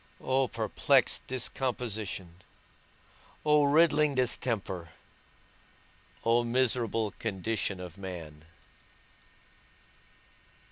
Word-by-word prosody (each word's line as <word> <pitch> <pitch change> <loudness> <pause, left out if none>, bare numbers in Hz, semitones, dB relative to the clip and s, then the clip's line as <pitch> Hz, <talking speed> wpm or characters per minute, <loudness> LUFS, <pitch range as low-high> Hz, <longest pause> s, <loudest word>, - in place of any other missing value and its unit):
O 130 0 +1
perplexed - - +2
discomposition, 110 -8 -3 1.0
O 150 -1 +5
riddling 150 -1 +4
distemper, 115 -8 -1 1.4
O 115 +1 +4
miserable 115 -3 +1
condition 100 -2 -2
of 90 0 -9
man! 80 -5 -8
115 Hz, 60 wpm, -30 LUFS, 95-130 Hz, 1.4 s, O